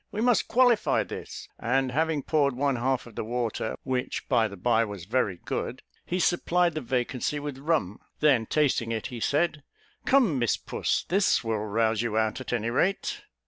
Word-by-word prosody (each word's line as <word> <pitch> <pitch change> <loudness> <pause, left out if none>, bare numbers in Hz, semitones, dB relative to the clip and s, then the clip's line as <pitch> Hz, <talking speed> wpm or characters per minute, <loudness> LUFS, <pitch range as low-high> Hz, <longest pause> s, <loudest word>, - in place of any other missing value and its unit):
We 210 - -4
must 240 0 +3
qualify 245 -2 +3
this;" - - -8
and 130 +2 +1
having 155 +1 0
poured 140 -4 +1
one 135 0 +1
half 130 +1 0
of 115 - -13
the - - -4
water, 115 -1 -2
which 130 -1 -3
by 120 -4 +3
the 100 -1 -10
by 115 +4 +2
was 100 -5 -6
very 105 -4 0
good, - - -3 0.2
he 180 - -1
supplied 175 0 +2
the 155 - -3
vacancy 125 +3 -1
with 145 -2 -6
rum. 140 - 0 0.2
Then 135 -7 +3
tasting 135 -6 +1
it, 110 -2 -3
he 120 - -5
said, 155 +5 +1 0.4
"Come, 235 - +3
Miss 120 -2 +1
Puss; - - -2
this 195 -5 +3
will 110 -2 -1
rouse 110 +1 0
you 115 -2 -1
out, 110 +4 0
at - - -6
any 115 -1 -1
rate." 190 +10 0
130 Hz, 185 wpm, -27 LUFS, 115-155 Hz, 0.4 s, must